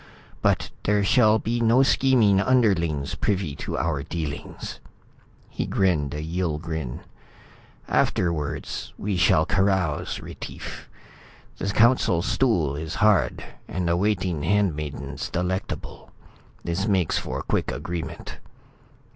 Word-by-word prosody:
But - - +1
there 105 0 +2
shall 110 +1 +5
be 115 +2 -1
no 115 +3 +5
scheming 120 -8 +4
underlings 90 - +2
privy 95 -8 -1
to - - -4
our 80 -4 0
dealings." 75 -2 -5 0.7
He - - -4
grinned 80 -7 +1
a 75 - -4
Yill 85 -1 -1
grin. 80 -6 -5 0.9
"Afterwards 85 -5 -1
we 100 -1 -2
shall 85 -3 +4
carouse, 95 -5 0
Retief. - - -8 0.7
The - - -2
Council 110 -6 +3
Stool 90 - +1
is 80 +2 -5
hard 105 -2 +3 0.2
and 90 -2 -2
the 85 - +2
waiting 90 -4 0
handmaidens 75 -6 -1
delectable. 90 +2 -4 0.5
This 90 +4 -1
makes 95 -6 +2
for 65 +2 -4
quick - - -1
agreement." 80 +3 -6
90 Hz, 115 wpm, -25 LUFS, 75-105 Hz, 0.9 s, shall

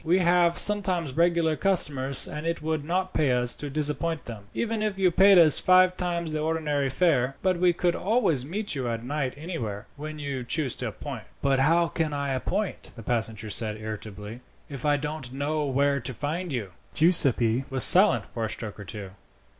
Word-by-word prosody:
We 170 +3 +2
have 175 -1 +2
sometimes 185 -8 +3
regular 170 0 +1
customers, 145 -8 0
and 150 +2 -6
it 165 -2 -3
would 155 -2 -2
not 185 +4 -2
pay 140 -5 +1
us 125 0 +1
to 145 - -7
disappoint 150 +1 -2
them, 110 -4 -9
even 225 -1 -3
if 210 -2 -2
you 185 -2 +2
paid 195 +2 +5
us 160 -4 +6
five 185 0 +4
times 170 -3 -3
the 155 - -2
ordinary 150 -3 -1
fare. 135 -4 +1
But 185 -2 +1
we 180 0 +4
could 175 0 -1
always 195 - 0
meet 200 +9 -4
you 130 -4 -3
at 115 0 -4
night 135 0 -3
anywhere, 125 - -6
when 155 +1 -7
you 140 -3 -5
choose 130 +1 -1
to - - -3
appoint." - - -8 0.2
"But 135 -1 +2
how 165 +5 +3
can 160 -2 -3
I 140 -1 -2
appoint," 190 +10 -4
the 115 - -10
passenger 110 -2 -2
said 110 0 -2
irritably, 110 +1 -8 0.3
"if 140 -1 -5
I 145 0 +3
don't 150 -3 -6
know 145 +2 -2
where 140 +1 +1
to 125 0 -4
find 165 +6 -4
you?" 110 -8 -4 0.2
Giuseppi 135 -7 +3
was 130 -1 +5
silent 195 +3 +7
for 115 -2 -5
a - - -4
stroke 110 -2 -6
or 100 - -9
two. 100 0 -8
150 Hz, 195 wpm, -26 LUFS, 125-170 Hz, 0.3 s, silent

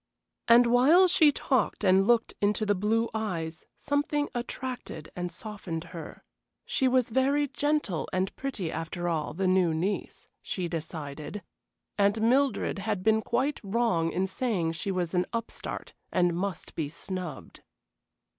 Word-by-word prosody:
And 240 +1 +7
while 270 +10 +6
she 330 -4 +6
talked 260 -6 0
and 190 0 +4
looked 235 -1 +3
into 210 +1 +2
the 205 - +3
blue 220 +4 +1
eyes 170 -7 -3
something 290 0 0
attracted 245 - -5
and 175 -1 -3
softened 180 -4 -6
her. 165 -3 -8 0.4
She 265 - +1
was 255 -2 +2
very 275 +4 +2
gentle 290 - -1
and 185 +1 -1
pretty, 220 -12 -3
after 165 +2 -4
all, 155 -3 -1
the 190 +2 -1
new 185 -3 +3
niece, 190 +6 -3
she 180 -2 -3
decided, 160 +2 -6 0.6
and 200 +2 +3
Mildred 245 -2 +2
had 195 -1 -2
been 220 +1 +4
quite 260 +6 0
wrong 195 -6 +1
in 185 +3 0
saying 190 -4 -1
she 165 +4 -4
was 180 -3 -1
an 180 0 +1
upstart 230 -1 -5 0.2
and 175 -2 +2
must 190 -1 -4
be 155 -3 -2
snubbed. 175 -2 -6
200 Hz, 145 wpm, -28 LUFS, 175-240 Hz, 0.6 s, And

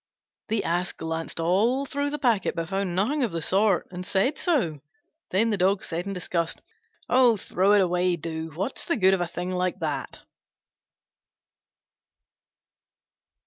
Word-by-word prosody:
The 220 -1 0
Ass 175 +2 -1
glanced 160 0 -4
all 215 +11 +2
through 285 +1 -2
the 295 - -3
packet, 235 - +1
but 165 -1 -3
found 195 -2 -1
nothing 255 +11 +1
of 240 - 0
the 165 - -2
sort, 195 +2 +2
and 180 0 -6
said 195 +10 +1
so. 235 - 0 0.5
Then 225 +5 +2
the 205 - +1
Dog 190 +2 +2
said 175 +3 -4
in 200 - -3
disgust, 170 -2 -2 0.5
"Oh, 245 -3 +5
throw 195 +1 +2
it 205 - +6
away, 180 0 +2
do: 160 0 -5
what's 195 +10 -4
the 340 - +1
good 190 -2 +5
of 190 - +1
a 175 - 0
thing 180 +2 -4
like 185 0 -1
that?" 155 -5 -3
185 Hz, 155 wpm, -26 LUFS, 175-220 Hz, 0.5 s, it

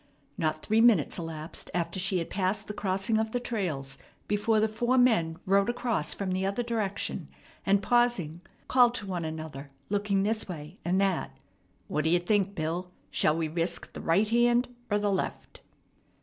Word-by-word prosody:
Not 155 -1 -1
three 220 +1 +3
minutes 215 -9 +4
elapsed 160 -1 -6
after 170 +1 -1
she 190 0 +1
had 165 - -3
passed 190 +1 0
the 210 - -4
crossing 195 +2 0
of 220 0 -2
the 245 - +1
trails 155 - -3 0.3
before 215 +2 +2
the 220 - +3
four 240 +4 +1
men 195 -11 +3
rode 195 +3 +3
across 240 -8 -1
from 195 -2 -2
the 185 +1 0
other 200 +5 0
direction, 220 -4 -2 0.4
and, 200 0 +3
pausing, 240 -10 +2 0.3
called 245 -2 +5
to 205 - -3
one 180 -4 -3
another, 155 -3 -6 0.2
looking 200 -1 +1
this 215 +2 0
way 150 -4 -8
and 180 +3 +1
that: 195 -3 0 0.5
"What 150 0 -1
d'ye 165 +2 +4
think, 200 +2 +1
Bill? 170 +3 -2 0.2
Shall 155 - +2
we 165 -1 0
risk 170 +2 -3
the - - -7
right 190 +6 +3
hand 240 +2 +3 0.2
'r 205 - +2
the 205 -1 +1
left?" 190 - -3
195 Hz, 175 wpm, -29 LUFS, 165-220 Hz, 0.5 s, called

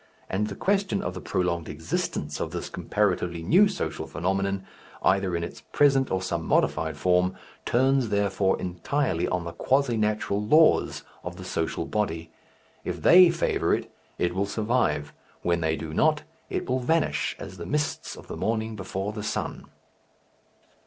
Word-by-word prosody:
And 105 +3 0
the - - -6
question 195 0 0
of - - -3
the - - -7
prolonged 85 -2 -1
existence 80 +2 -3
of - - -2
this - - -5
comparatively 85 -2 -1
new 190 - +6
social 200 -3 -4
phenomenon, 95 +3 -1 0.4
either 95 -2 +2
in 85 - -1
its - - -7
present 135 -2 +4
or 95 0 -1
some 85 -3 -2
modified 80 -1 +1
form, 90 +3 +2 0.3
turns, 130 0 +2
therefore, 100 -1 +1
entirely 90 - -1
on 90 -1 -1
the 85 - -5
quasi 130 +3 +1
natural 105 -1 0
laws 155 +9 +4 0.2
of - - -6
the - - -9
social - - -2
body. 85 -6 -2 0.5
If - - -4
they 180 0 +8
favour 170 0 +1
it, - - -6 0.3
it 85 0 0
will 100 +2 0
survive; 105 - 0 0.3
when 85 -1 +1
they 80 0 +1
do 80 -1 -6
not, 155 - +3 0.3
it - - -3
will 130 0 +1
vanish 160 +5 +1
as 95 - -9
the 85 - -7
mists 150 +1 -2
of - - -12
the - - -6
morning 110 0 -1
before 95 +1 -4
the 105 - -5
sun. 105 - -3
100 Hz, 160 wpm, -26 LUFS, 85-130 Hz, 0.5 s, they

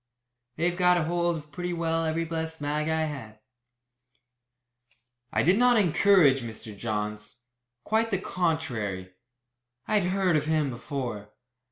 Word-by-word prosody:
They've 170 +2 0
got 180 -2 +3
hold 170 0 0
of 150 -1 -11
pretty 175 +3 -4
well 165 -1 0
every 160 +1 -1
blessed 160 0 -4
mag 150 +1 -1
I 160 0 +1
had." 130 -9 -6 1.9
I - - +1
did 185 +7 +4
not 245 -1 +5
encourage 175 -7 +4
Mr. 110 -2 -7
Johns; 105 +1 -4 0.4
quite 220 +1 +1
the 195 - +1
contrary. 120 - -2 0.7
I 215 - +3
had 180 -2 -1
heard 185 -3 +2
of 150 0 -2
him 155 -3 +1
before. 120 -4 -5
160 Hz, 135 wpm, -27 LUFS, 125-175 Hz, 1.9 s, not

